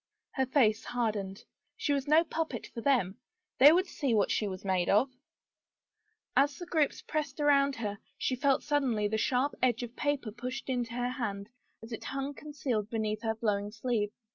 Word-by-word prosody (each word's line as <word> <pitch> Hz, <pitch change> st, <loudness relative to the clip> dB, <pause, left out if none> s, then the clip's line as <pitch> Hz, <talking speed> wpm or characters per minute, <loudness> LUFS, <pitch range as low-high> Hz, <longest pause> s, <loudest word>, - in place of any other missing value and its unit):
Her 265 Hz, -1 st, 0 dB
face 230 Hz, -5 st, +3 dB
hardened. 210 Hz, -5 st, -2 dB, 0.3 s
She 375 Hz, -11 st, 0 dB
was 280 Hz, 0 st, -1 dB
no 310 Hz, +3 st, +6 dB
puppet 320 Hz, -7 st, -3 dB
for 230 Hz, -, -5 dB
them. 225 Hz, -8 st, +1 dB, 0.4 s
They 285 Hz, +3 st, +10 dB
would 365 Hz, +3 st, +3 dB
see 275 Hz, -, -1 dB
what 205 Hz, -, +2 dB
she 210 Hz, -, +1 dB
was 185 Hz, 0 st, -6 dB
made 185 Hz, -2 st, +1 dB
of! 255 Hz, +7 st, +4 dB, 1.2 s
As 280 Hz, 0 st, +3 dB
the 350 Hz, -, -7 dB
groups 305 Hz, -3 st, 0 dB
pressed 300 Hz, -2 st, -3 dB
around 280 Hz, -2 st, +4 dB
her, 205 Hz, -3 st, -4 dB, 0.2 s
she 255 Hz, -, 0 dB
felt 275 Hz, +1 st, +2 dB
suddenly 260 Hz, -8 st, +1 dB
the 220 Hz, +1 st, -1 dB
sharp 260 Hz, +5 st, +1 dB
edge 245 Hz, -1 st, +2 dB
of 240 Hz, 0 st, -7 dB
paper 285 Hz, -6 st, -1 dB
pushed 250 Hz, +4 st, -6 dB
into 245 Hz, -3 st, -1 dB
her 245 Hz, 0 st, -1 dB
hand 210 Hz, -5 st, -4 dB, 0.3 s
as 225 Hz, -, -10 dB
it 225 Hz, -, -6 dB
hung 275 Hz, +1 st, -3 dB
concealed 270 Hz, -8 st, -3 dB
beneath 215 Hz, -1 st, -2 dB
her 225 Hz, -1 st, -1 dB
flowing 205 Hz, -2 st, -1 dB
sleeve. 215 Hz, -1 st, -1 dB
245 Hz, 180 wpm, -31 LUFS, 215-280 Hz, 1.2 s, They